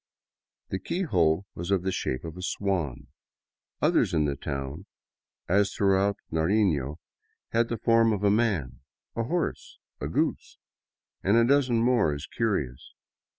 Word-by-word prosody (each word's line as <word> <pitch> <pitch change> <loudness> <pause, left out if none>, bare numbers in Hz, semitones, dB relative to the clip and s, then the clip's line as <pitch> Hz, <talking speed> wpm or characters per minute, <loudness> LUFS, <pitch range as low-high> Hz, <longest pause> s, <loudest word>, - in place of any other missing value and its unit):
The 95 - -2
keyhole 95 - +1
was 85 +2 -6
of 95 -3 +2
the 95 - 0
shape 65 -7 -2
of 80 0 -7
a 90 - -8
swan; 90 -8 -2 0.7
others - - +3
in 75 -2 +3
the 70 -1 -1
town, 70 +7 -5 0.6
as 100 +2 +2
throughout 100 0 +2
Nariiio, 80 -4 +1 0.5
had 115 0 +2
the 115 - -2
form 115 0 +4
of 105 -2 -2
a 100 - +4
man, 105 - 0 0.4
a 115 - -1
horse, 170 +7 -3 0.2
a - - -3
goose, - - -1 0.6
and 100 +4 +3
a 115 - +5
dozen 130 -3 +3
more 120 -11 +3
as 70 - -6
curious. 75 - -2
95 Hz, 145 wpm, -27 LUFS, 80-115 Hz, 0.7 s, a